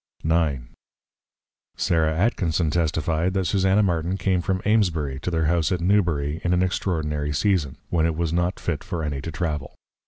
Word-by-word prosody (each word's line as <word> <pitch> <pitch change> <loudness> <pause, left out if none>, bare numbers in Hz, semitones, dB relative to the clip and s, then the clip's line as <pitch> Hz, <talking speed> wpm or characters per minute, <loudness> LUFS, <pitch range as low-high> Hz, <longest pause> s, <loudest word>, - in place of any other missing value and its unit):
IX. 80 -6 +1 1.1
Sarah 80 -2 +1
Atkinson 85 -5 +1
testify'd, 80 +2 0
That 95 -1 +1
Susanna 95 +2 +3
Martin 85 0 0
came 95 -2 +1
from 95 +2 -1
Amesbury 85 -11 +1
to 90 - -3
their 80 -2 0
House 85 +2 +1
at 90 - 0
Newbury, 85 -5 +1
in 90 - +1
an 90 +1 +3
extraordinary 75 -5 -1
Season, 85 -4 0
when 80 -2 +2
it 80 - -1
was 85 0 -1
not 85 +2 0
fit 80 -5 -3
for 85 -2 -4
any 70 -3 -3
to 80 - -5
Travel. 75 -4 -3
85 Hz, 165 wpm, -24 LUFS, 80-90 Hz, 1.1 s, Susanna